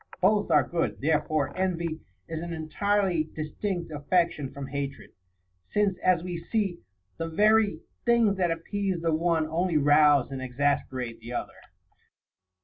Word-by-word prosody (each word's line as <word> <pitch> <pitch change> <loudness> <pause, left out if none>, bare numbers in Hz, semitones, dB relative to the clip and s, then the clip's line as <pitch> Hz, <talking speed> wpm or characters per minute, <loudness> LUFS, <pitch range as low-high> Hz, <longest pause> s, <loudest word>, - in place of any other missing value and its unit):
Both 205 +2 +3
are - - +5
good. 170 -1 -1
Therefore 150 -1 0
envy 170 -4 -1 0.3
is 160 -1 -4
an 170 0 -5
entirely 175 +2 0
distinct 170 +3 -3
affection 150 -1 0
from 140 -1 -6
hatred, 140 0 -5 0.6
since, 205 -2 +2
as 180 -2 +3
we 175 -2 -4
see, 195 -2 -1 0.4
the 165 0 -3
very 210 -1 +3 0.2
things 230 -4 +3
that 180 -2 +2
appease 185 +3 -2
the 165 -1 +2
one 165 0 +1
only 165 +1 0
rouse 145 -2 +5
and 135 -1 -5
exas 140 +3 0
perate 125 -3 -5
the 115 +2 -8
other. - - -4
165 Hz, 140 wpm, -27 LUFS, 145-185 Hz, 0.6 s, are